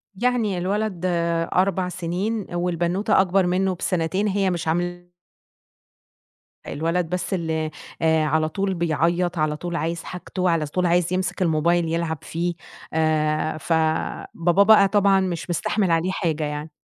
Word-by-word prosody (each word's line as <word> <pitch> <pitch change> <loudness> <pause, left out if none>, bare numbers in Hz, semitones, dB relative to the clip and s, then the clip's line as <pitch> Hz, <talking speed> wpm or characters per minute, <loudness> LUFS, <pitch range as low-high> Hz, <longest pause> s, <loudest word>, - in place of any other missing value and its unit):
يعني 230 -3 0
الولد، 195 0 -2
آآ 170 -1 +1
4 185 0 +1
سنين، 185 +5 -3
والبنوتة 175 +4 +1
أكبر 190 0 +2
منه 185 +1 +1
بسنتين، 180 +3 -1
هي 195 -1 +1
مش 170 -2 -3
عاملة 175 +2 -2 1.6
الولد 165 +3 -1
بس 180 +2 -2
اللي 160 -3 -1 0.3
آآ، 160 -1 +3
على 155 +1 +1
طول 195 +3 -1
بيعيط، 170 +1 0
على 155 -1 0
طول 175 +1 -5
عايز 165 0 -2
حاجته، 180 0 -3
على 165 -2 +1
طول 180 +5 -1
عايز 175 0 +2
يمسك 185 +1 -2
الموبايل 170 0 +2
يلعب 165 -1 -1
فيه. 175 +2 -2 0.4
آآ 155 0 +1
فباباه 165 +3 +1
بقى 205 -1 +7
طبعًا 200 -1 +3
مش 180 -2 -3
مستحمل 185 +2 0
عليه 165 +3 +1
حاجة 160 -5 -1
يعني. 150 +1 -4
175 Hz, 140 wpm, -23 LUFS, 160-185 Hz, 1.6 s, بقى